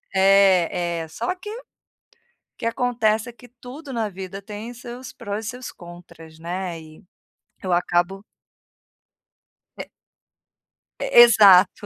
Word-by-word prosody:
É, 185 Hz, -3 st, +3 dB
é, -, -, -14 dB
só 365 Hz, -, -3 dB
que 415 Hz, +3 st, -10 dB
o 470 Hz, +3 st, -8 dB, 0.9 s
que -, -, -7 dB
acontece 230 Hz, -1 st, 0 dB
é -, -, -12 dB
que 245 Hz, +1 st, -17 dB
tudo 255 Hz, +4 st, -11 dB
na 225 Hz, -2 st, -1 dB
vida 190 Hz, +1 st, -8 dB
tem 210 Hz, +4 st, -8 dB
seus 245 Hz, +1 st, -10 dB
prós 215 Hz, -3 st, -6 dB
e -, -, -2 dB
seus 250 Hz, 0 st, -8 dB
contras, 170 Hz, -2 st, -14 dB
né, 175 Hz, 0 st, -5 dB
e 155 Hz, +5 st, -16 dB, 0.6 s
eu 185 Hz, -2 st, -3 dB
acabo 175 Hz, +3 st, 0 dB, 1.5 s
É -, -, -7 dB, 1.1 s
E -, -, -3 dB, 0.2 s
exato. 205 Hz, -3 st, +5 dB
200 Hz, 125 wpm, -22 LUFS, 175-240 Hz, 1.5 s, exato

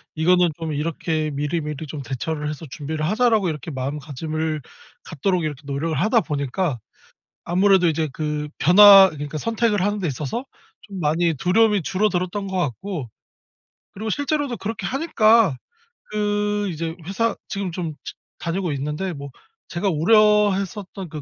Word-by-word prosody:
이거는 175 Hz, +2 st, +4 dB
좀 160 Hz, -2 st, -3 dB
이렇게 155 Hz, 0 st, -2 dB
'미리미리 150 Hz, +1 st, -3 dB
좀 145 Hz, 0 st, -6 dB
대처를 150 Hz, +4 st, -4 dB
해서 150 Hz, +2 st, -6 dB
준비를 155 Hz, +3 st, -4 dB
하자.'라고 220 Hz, -1 st, +2 dB
이렇게 150 Hz, 0 st, -5 dB
마음가짐을 150 Hz, +3 st, -3 dB, 0.4 s
갖도록 175 Hz, +3 st, -1 dB
이렇게 150 Hz, -2 st, -4 dB
노력을 145 Hz, +3 st, -2 dB
하다 225 Hz, +4 st, +3 dB
보니까 145 Hz, 0 st, -2 dB, 0.7 s
아무래도 185 Hz, 0 st, +4 dB
이제 160 Hz, 0 st, 0 dB
그 150 Hz, 0 st, -3 dB
변화 195 Hz, +2 st, +9 dB
그러니까 150 Hz, 0 st, -6 dB
선택을 225 Hz, +1 st, 0 dB
하는 205 Hz, +1 st, 0 dB
데 185 Hz, -, -2 dB
있어서 150 Hz, -, -3 dB, 0.4 s
좀 200 Hz, -2 st, -9 dB
많이 165 Hz, +2 st, +1 dB
두려움이 205 Hz, -, +3 dB
줄어들었던 190 Hz, +1 st, -1 dB
것 190 Hz, -1 st, -4 dB
같고 160 Hz, -, -3 dB, 0.8 s
그리고 220 Hz, +2 st, -4 dB
실제로도 285 Hz, -2 st, -1 dB
그렇게 210 Hz, -1 st, -4 dB
하니까 225 Hz, -, +3 dB, 0.6 s
그 205 Hz, -1 st, 0 dB
이제 165 Hz, -1 st, -4 dB
회사 230 Hz, +4 st, 0 dB
지금 195 Hz, -3 st, -3 dB
좀 165 Hz, -2 st, -4 dB
지 -, -, -7 dB, 0.3 s
다니고 175 Hz, 0 st, -2 dB
있는데 150 Hz, +7 st, -3 dB
뭐 140 Hz, -2 st, -8 dB, 0.4 s
제가 190 Hz, +3 st, -1 dB
우려했었던 200 Hz, +1 st, +2 dB
그 155 Hz, -1 st, -7 dB
175 Hz, 340 characters per minute, -22 LUFS, 150-205 Hz, 0.8 s, 변화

